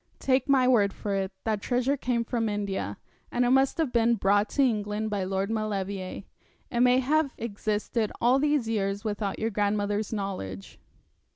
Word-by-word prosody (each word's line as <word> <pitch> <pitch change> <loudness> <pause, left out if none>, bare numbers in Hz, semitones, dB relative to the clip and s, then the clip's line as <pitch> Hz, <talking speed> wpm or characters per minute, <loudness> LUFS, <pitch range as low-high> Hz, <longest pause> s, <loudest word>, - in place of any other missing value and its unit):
Take 265 +1 +1
my 260 -2 +4
word 210 -6 +4
for 205 - -4
it, 195 0 -1
that 215 -2 -1
treasure 255 +4 +1
came 245 -3 -1
from 225 -2 -1
India; 200 - -3 0.3
and 245 0 +1
it 245 - +2
must 265 +1 +3
have 315 -6 0
been 235 0 +3
brought 205 0 +2
to 280 - +2
England 215 -3 -1
by 200 -2 -1
Lord 195 +2 -1
Maulevrier. 200 -3 -3 0.5
It 235 - -1
may 250 +1 +5
have 280 +2 +1
existed 215 0 -2
all 250 +3 +4
these 290 -4 +1
years 200 -2 -1
without 205 -2 -2
your 225 +1 -1
grandmother's 205 0 0
knowledge. 185 - -5
215 Hz, 170 wpm, -27 LUFS, 200-245 Hz, 0.5 s, may